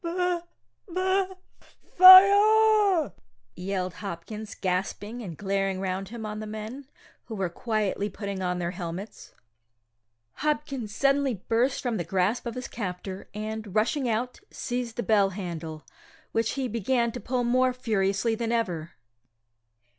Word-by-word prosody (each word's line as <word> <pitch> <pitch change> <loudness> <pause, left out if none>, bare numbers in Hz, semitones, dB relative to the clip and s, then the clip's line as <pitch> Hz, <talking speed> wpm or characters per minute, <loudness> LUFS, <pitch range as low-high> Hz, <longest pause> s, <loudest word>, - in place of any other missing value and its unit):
"B 355 +1 0 0.5
B 375 +2 +1 0.7
Fire!" 400 - +8 0.4
yelled 185 -1 -3
Hopkins, 205 +3 -7
gasping, 195 +5 -3
and 175 -8 -7
glaring 195 +1 -1
round 190 0 -3
him 230 -1 -7
on 210 0 -5
the 215 - -6
men, 220 +6 -7 0.4
who 225 - -7
were 190 -3 -1
quietly 210 0 -1
putting 200 -3 -5
on 180 -1 -1
their 175 -1 -2
helmets. 180 +3 -7 1.0
Hopkins 285 -7 -2
suddenly 275 -2 +2
burst 245 +4 +1
from 240 -3 -1
the 175 - -2
grasp 190 +8 0
of 235 - -5
his 250 0 -5
captor, 190 -2 -6
and, 215 -1 -5
rushing 245 +4 +1
out, 240 +3 -2
seized 245 -2 -4
the 240 - -2
bell 205 -3 +3
handle, 170 -5 -6 0.5
which 225 0 0
he 270 -2 -2
began 235 +1 0
to 245 - -6
pull 250 0 -1
more 255 +2 +3
furiously 215 -3 0
than 230 0 -2
ever. 175 -9 -2
220 Hz, 135 wpm, -27 LUFS, 195-255 Hz, 1.0 s, Fire